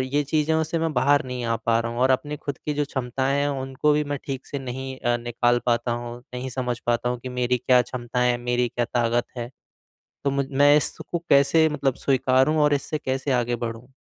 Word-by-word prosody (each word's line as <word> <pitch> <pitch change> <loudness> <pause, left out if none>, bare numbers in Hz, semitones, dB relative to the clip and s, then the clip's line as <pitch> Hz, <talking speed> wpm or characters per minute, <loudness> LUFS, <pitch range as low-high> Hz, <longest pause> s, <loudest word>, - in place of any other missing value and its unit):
ये 135 +3 0
चीज़ों 160 +2 +1
से 165 +2 -2
मैं 160 -1 -1
बाहर 140 +2 +3
नहीं 125 -1 -5
आ 115 0 0
पा 115 0 +3
रहा 115 0 -3
हूँ 120 - -4
और 130 +1 +4
अपनी 145 +3 0
खुद 140 -2 -6
की 150 - 0
जो 145 0 0
क्षमताएँ 135 +1 -1
हैं 145 - +1
उनको 135 +3 +1
भी 150 0 +1
मैं 145 -1 -3
ठीक 135 -1 -5
से 140 - -4
नहीं 130 0 -6
अ, 120 -1 +1
निकाल 120 0 +1
पाता 120 0 +1
हूँ, 120 0 -5 0.2
नहीं 125 +1 -4
समझ 125 -1 -2
पाता 120 0 +1
हूँ 125 0 -2
कि 130 - -5
मेरी 125 0 0
क्या 125 +1 +4
क्षमताएँ 125 0 -1
है? 120 - 0
मेरी 120 0 0
क्या 120 +1 -1
ताक़त 120 0 0
है? 120 0 -5 0.7
तो 140 - +1
मुझ 140 0 0
मैं 145 +2 +5
इसको 170 +3 -1
कैसे 140 +3 +5
मतलब 140 -4 0
स्वीकारूँ 135 +3 +2
और 150 0 +3
इससे 145 +2 -1
कैसे 130 +1 -1
आगे 120 -1 +1
बढ़ूँ? 115 +1 -6
130 Hz, 225 wpm, -24 LUFS, 120-140 Hz, 0.7 s, मैं